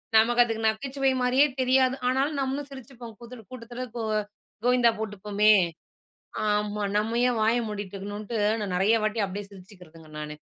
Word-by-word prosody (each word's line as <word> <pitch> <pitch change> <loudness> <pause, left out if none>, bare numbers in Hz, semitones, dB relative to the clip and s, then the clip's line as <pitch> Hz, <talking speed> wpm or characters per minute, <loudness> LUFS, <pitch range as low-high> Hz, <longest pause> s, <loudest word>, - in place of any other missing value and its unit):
நமக்கு 240 +2 +5
அதுக்கு 225 -1 -3
நகைச்சுவை 270 +4 -1
மாரியே 255 +3 +4
தெரியாது, 260 0 +3
ஆனாலும் 275 +3 +1
நம்மளும் 275 +2 -2
சிரிச்சுப்போம், 245 -3 -10
கூதல 235 -1 -11
கூட்டத்ல 245 +1 -7
கோ - - -2 0.6
கோயிந்தா 245 -1 +5
போட்டுப்போமே, 210 0 +2 0.9
ஆமா 210 0 0
நம்ம 225 +3 0
ஏன் 240 -2 0
வாய 225 +2 +3
மூடிட்டுருக்கணுன்ட்டு 205 +2 -5 0.2
நான் 190 -3 -3
நெறைய 210 +5 +3
வாட்டி 215 +1 0
அப்டியே 200 +1 -6
சிரிச்சுக்கிறதுங்க, 180 -5 -15
நானு 150 0 -6
225 Hz, 135 wpm, -26 LUFS, 205-250 Hz, 0.9 s, நமக்கு